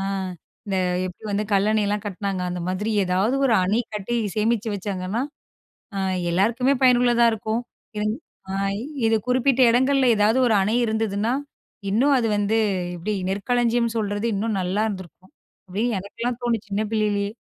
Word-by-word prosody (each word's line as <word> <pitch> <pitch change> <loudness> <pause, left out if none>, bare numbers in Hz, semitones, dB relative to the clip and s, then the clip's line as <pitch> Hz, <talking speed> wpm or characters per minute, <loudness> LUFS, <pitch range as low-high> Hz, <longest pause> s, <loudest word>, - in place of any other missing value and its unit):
அ - - -2 0.6
இந்த 195 -2 -1 0.3
எப்படி 180 +4 -10
வந்து 205 +1 0
கல்லணையெல்லாம் 205 0 +2
கட்டினாங்க. 195 -1 -3
அந்த 180 0 -4
மாதிரி 205 +4 -2
ஏதாவது 190 +7 +1
ஒரு 235 - +3
அணை 210 +6 +2
கட்டி 210 +3 -3 0.2
சேமிச்சு 220 +1 +1
வச்சாங்கன்னா, 195 +2 -3 0.8
அ - - -1 0.3
எல்லாருக்குமே 235 +9 +2
பயனுள்ளதா 240 -1 +5
இருக்கும். 220 +2 -2 0.4
இங் 215 0 0 0.4
அ - - -3 0.5
இது 225 - +3
குறிப்பிட்ட 255 +1 +2
இடங்கள்ல 260 +2 +3
ஏதாவது 215 +5 +3
ஒரு 220 - +3
அணை 210 +4 +1
இருந்ததுனா, 220 +1 0 0.6
இன்னும் 270 +7 +4
அது 230 - 0
வந்து 205 +2 +1 0.4
எப்படி 190 +5 -3 0.2
நெற்களஞ்சியம் 235 +3 +1
சொல்றது 205 0 -1
இன்னும் 210 0 -1
நல்லா 185 +4 0
இருந்திருக்கும். 185 -2 -8 0.4
அப்படின்னு 215 +5 -1
எனக்கெல்லாம் 235 +5 -4
தோணுது 230 -3 -1
சின்ன 200 +2 -1
பிள்ளையிலேயே. 205 -2 0
215 Hz, 140 wpm, -23 LUFS, 200-235 Hz, 0.8 s, பயனுள்ளதா